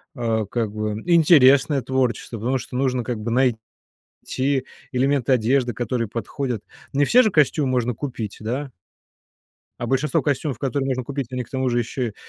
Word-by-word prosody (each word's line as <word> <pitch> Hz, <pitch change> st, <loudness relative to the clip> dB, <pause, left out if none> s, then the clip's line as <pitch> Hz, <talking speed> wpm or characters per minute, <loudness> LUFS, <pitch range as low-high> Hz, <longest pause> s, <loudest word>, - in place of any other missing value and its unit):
а, 115 Hz, -4 st, 0 dB
как 110 Hz, +1 st, -2 dB
бы 105 Hz, 0 st, -3 dB
интересное 145 Hz, -5 st, +5 dB
творчество, 125 Hz, -3 st, -1 dB
потому 125 Hz, +5 st, 0 dB
что 125 Hz, 0 st, -6 dB
нужно 130 Hz, -2 st, 0 dB
как 120 Hz, -2 st, -3 dB
бы 110 Hz, +2 st, -3 dB, 0.7 s
найти 135 Hz, 0 st, -2 dB, 0.3 s
элементы 135 Hz, 0 st, +2 dB
одежды, 125 Hz, +1 st, +2 dB
которые 120 Hz, -1 st, -2 dB
подходят. 120 Hz, 0 st, -4 dB, 0.3 s
Не 145 Hz, +1 st, +3 dB
все 250 Hz, -, +6 dB
же -, -, +3 dB
костюмы 150 Hz, -3 st, +2 dB
можно 125 Hz, -1 st, 0 dB
купить, 115 Hz, -5 st, -5 dB
да? 130 Hz, +6 st, -4 dB, 1.1 s
А 120 Hz, -, -3 dB
большинство 135 Hz, +2 st, +1 dB
костюмов, 140 Hz, -1 st, -1 dB
которые 135 Hz, 0 st, -1 dB
можно 130 Hz, -1 st, -1 dB
купить, 135 Hz, -1 st, -5 dB
они 125 Hz, -1 st, -3 dB
к -, -, -19 dB
тому 130 Hz, -1 st, -1 dB
же 120 Hz, 0 st, +1 dB
еще 120 Hz, -1 st, -3 dB
130 Hz, 160 wpm, -22 LUFS, 120-140 Hz, 1.1 s, все